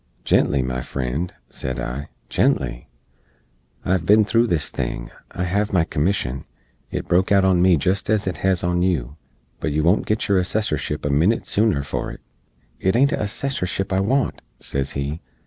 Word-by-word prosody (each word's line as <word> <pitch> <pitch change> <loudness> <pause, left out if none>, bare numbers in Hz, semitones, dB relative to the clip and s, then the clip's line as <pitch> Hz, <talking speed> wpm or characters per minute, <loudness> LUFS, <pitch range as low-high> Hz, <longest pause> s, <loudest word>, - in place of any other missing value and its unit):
"Gently, 70 -2 +3
my 65 0 -2
frend," 70 +7 -3 0.2
sed 65 -1 -4
I, 70 +4 -4 0.2
"gently! - - 0 1.0
I - - 0
hev 95 -3 +2
bin 105 +1 +6
thro' 115 +2 +3
this 85 -8 0
thing; - - -4 0.2
I 90 - -4
hev 100 +3 0
my 90 -4 +3
commission. 75 -6 -1 0.4
It - - -4
broke 90 +3 +2
out 100 -1 +5
on 95 -2 +4
me 90 -2 +5
jest 95 +8 0
ez 110 -1 +2
it 90 - -2
hez 95 -2 +1
on 90 0 +1
yoo; 75 -9 0 0.5
but 80 - -2
yoo 75 +1 +1
won't 90 +6 +3
git 105 +1 0
yoor 100 -3 +3
Assessorship 80 -7 -1
a 75 - +1
minit 85 +11 +2
sooner 105 -9 +2
for 70 - -3
it." - - -10 0.6
"It 95 +2 +1
ain't 140 +4 +4
a - - -1
Assessorship 100 -3 -2
I 95 - +2
want," 125 +7 0 0.2
sez 70 0 -3
he. 70 +4 -3
90 Hz, 180 wpm, -22 LUFS, 70-100 Hz, 1.0 s, bin